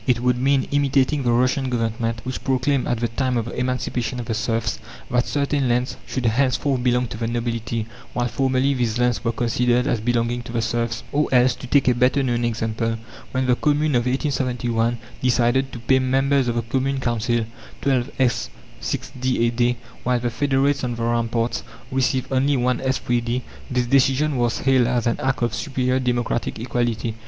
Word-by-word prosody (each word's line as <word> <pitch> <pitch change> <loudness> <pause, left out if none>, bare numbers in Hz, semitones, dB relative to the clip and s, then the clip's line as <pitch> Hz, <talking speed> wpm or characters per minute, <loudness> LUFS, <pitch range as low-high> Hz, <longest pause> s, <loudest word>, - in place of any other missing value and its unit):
It 125 -2 +3
would 125 0 +2
mean 135 +1 +2
imitating 140 0 +2
the 120 -2 +1
Russian 130 +2 +2
Government, 115 -1 -1
which 130 0 -4
proclaimed, 130 +1 +1
at 120 -1 -1
the 120 - +2
time 125 +1 -1
of 115 - -1
the 120 - -6
emancipation 125 -1 -2
of 120 - -4
the 115 - -2
serfs, 110 - -1 0.3
that 125 0 +2
certain 140 -2 0
lands 125 +1 0
should 130 -2 -3
henceforth 130 +3 +1
belong 125 0 +2
to - - -6
the 115 0 -2
nobility, 115 -1 -2 0.3
while 120 0 0
formerly 130 +2 +1
these 120 -3 0
lands 125 -1 +1
were 115 - +1
considered 120 +1 +1
as 115 - +1
belonging 120 +1 0
to 120 - -9
the 115 -1 0
serfs. 115 0 -1
Or 150 +1 +1
else, 125 -1 +5
to 130 - -9
take 140 +1 +3
a 125 - +5
better 125 +3 +2
known 120 -2 0
example, 115 0 -1 0.3
when 130 0 0
the 125 -1 +3
Commune 150 +2 +1
of 120 0 +2
1871 125 -4 0 0.2
decided 125 +1 +2
to - - -7
pay 130 +3 +2
members 135 +1 +2
of 120 - 0
the 120 - 0
Commune 135 +3 -1
Council 120 -1 0 0.4
12s. 130 -1 +1 0.3
6d. 130 0 -2
a - - +1
day, 120 +1 +1 0.2
while 125 0 +1
the 120 0 -2
Federates 140 +2 +1
on 120 -1 -1
the 115 - -4
ramparts 115 0 0 0.3
received 130 0 0
only 135 +2 +2
1s. 125 0 +1 0.2
3d., 120 +1 -1 0.3
this 125 -1 +1
decision 135 +3 +3
was 120 -1 +1
hailed 130 -3 +3
as 120 -2 0
an 115 - 0
act 135 -2 0
of 120 - 0
superior 130 -2 0
democratic 120 -2 -1
equality. 120 -1 -1
125 Hz, 185 wpm, -22 LUFS, 120-130 Hz, 0.4 s, else